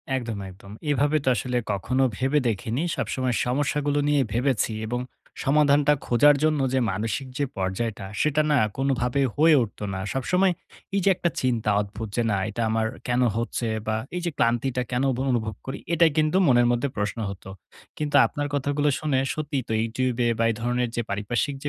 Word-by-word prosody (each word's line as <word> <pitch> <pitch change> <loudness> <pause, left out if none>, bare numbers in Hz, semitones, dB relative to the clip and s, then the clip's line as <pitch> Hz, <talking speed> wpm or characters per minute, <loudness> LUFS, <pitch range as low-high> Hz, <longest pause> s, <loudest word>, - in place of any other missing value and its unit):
একদম, 115 -4 -3
একদম। 100 +1 -13 0.2
এভাবে 145 +1 +2
তো - - -9
আসলে 125 0 -2
কখনো 125 +7 0
ভেবে 135 +3 +2
দেখিনি। 115 +4 -1
সবসময় 130 -2 -1
সমস্যাগুলো 145 +3 0
নিয়ে 145 -1 +3
ভেবেছি 120 -2 +1
এবং 120 +2 -2 0.4
সমাধানটা 145 +1 +4
খোঁজার 145 +5 +5
জন্য 155 -1 +2
যে 130 - +3
মানসিক 110 +7 -3
যে 145 - +1
পর্যায়টা, 95 +2 -2 0.2
সেটা 150 0 +2
না 150 - +4 0.2
কোনভাবে 135 -1 0
হয়ে 160 +1 +5
উঠত 110 - -9
না। 95 - -3
সবসময় 180 +8 +2 0.4
এই 200 - +2
যে 200 - +4
একটা 175 - 0
চিন্তা 120 -4 0
অদ্ভুত 110 +2 -6
যে 120 - +1
না 100 - +1
এটা 110 +2 -4
আমার 110 0 +1 0.2
কেন 125 0 +1 0.2
হচ্ছে? 115 0 -2 0.2
বা 110 - +1 0.2
এই 180 - -2
যে 170 - -1
ক্লান্তিটা 120 +2 +1
কেন 125 +2 0
ব - - -7
অনুভব 110 -3 -1
করি 135 +1 -4 0.2
এটাই 165 -1 +5
কিন্তু 155 +3 +3
মনের 120 -2 +5
মধ্যে 120 +3 0
প্রশ্ন 105 +2 -2
হতো। 95 -1 -9 0.5
কিন্তু 150 -1 -2
আপনার 145 0 -3
কথাগুলো 145 +1 +1
শুনে, 145 -4 +1
সত্যি 150 -2 -3
তো - - -2
YouTube 120 +2 -1
এ - - +3
বা - - +3
এই - - -4
ধরনের 120 0 0
যে 120 - 0
পারিপার্শ্বিক 115 +8 -1
125 Hz, 180 wpm, -25 LUFS, 115-145 Hz, 0.5 s, খোঁজার